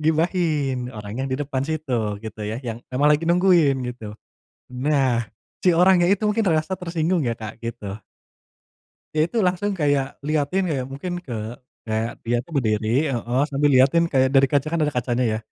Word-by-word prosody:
Ghibahin 155 -5 0
orang 105 -3 -8
yang - - -3
di 130 - -1
depan 140 -2 -3
situ, 130 -8 -2
gitu 110 0 -8
ya 105 +2 -3
yang 115 0 -5
emang 140 +3 +2
lagi 160 +3 0
nungguin 170 -7 +4
gitu. 110 -3 -9 0.6
Nah 130 -3 +1 0.3
si 180 -3 +3
orangnya 180 0 +5
itu 200 +2 +2
mungkin 210 +2 +1
merasa 155 +2 +1
tersinggung 170 -1 -1
ya 115 - -2
Kak, 110 +1 -8
gitu. 110 -3 -6 1.1
Ya 155 - +1
itu 235 - -1
langsung 180 +3 0
kayak 145 -3 0
lihatin 155 +5 0
kayak 135 -6 -2
mungkin 140 +7 -5
ke 115 -6 -5 0.3
kayak 110 +1 -2
dia 120 +1 0
tuh 170 - -15
berdiri, 115 +3 +1
heeh, 120 0 -1
sambil 145 +1 +2
lihatin 135 +6 +5
kayak 130 -4 +2
dari 135 0 +5
kaca, 140 +2 0
kan 170 - 0
ada 150 -2 0
kacanya 125 0 0
ya, - - -1
135 Hz, 175 wpm, -23 LUFS, 120-165 Hz, 1.1 s, orangnya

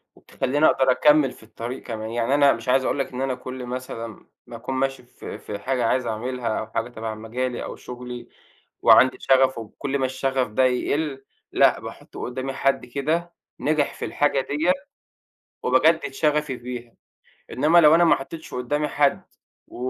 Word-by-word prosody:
وبتخلِّيني 145 +4 -1
أقدر 130 -3 +4
أكمِّل 150 +1 +4
في - - -16
الطريق 115 +3 -7
كمان. 110 -2 -5
يعني، 115 +3 0
أنا 140 -1 +5
مش 115 +2 -6
عايز 130 +1 +4
أقول - - 0
لك 135 - -2
إن 125 - -4
أنا 135 -1 -1
كل 130 0 -7
مثلًا، 120 -3 -6 0.2
ما 120 - -9
أكون 125 +3 -5
ماشي 135 0 -1
في 120 - -9
في 105 -1 -7
حاجة 125 +2 -1
عايز 125 +2 +1
أعملها، 115 +1 -2
أو 110 - -5
حاجة 115 +2 -3
تبع 110 -2 -5
مجالي 120 +3 -3
أو - - -6
شُغلي، 125 0 -8 0.5
وعندي 130 0 +6
شغف، 130 -1 +3
وكل 135 +5 -4
ما 130 - +1
الشغف 130 0 -1
ده 110 +4 +1
يقِل، 135 +2 -1 0.3
لأ، - - +4
باحُط - - -11
قُدَّامي 130 +2 -4
حد 135 -1 0
كده، 155 +7 -2 0.3
نجح 150 -1 +1
في - - -5
الحاجة 145 -2 +1
ديّة، 150 +6 +1 0.9
وبجدِّد 155 +6 +3
شغفي 150 -2 0
ف - - -22
بيها. 120 -1 -7 0.6
إنما 155 +6 +5
لو 155 -1 +7
أنا 170 +1 +5
ما 170 - +6
حطَّيتش 160 +4 -9
قُدَّامي 145 +4 -1
حد، 145 0 +2 0.5
و - - -13
130 Hz, 175 wpm, -24 LUFS, 120-140 Hz, 0.9 s, لو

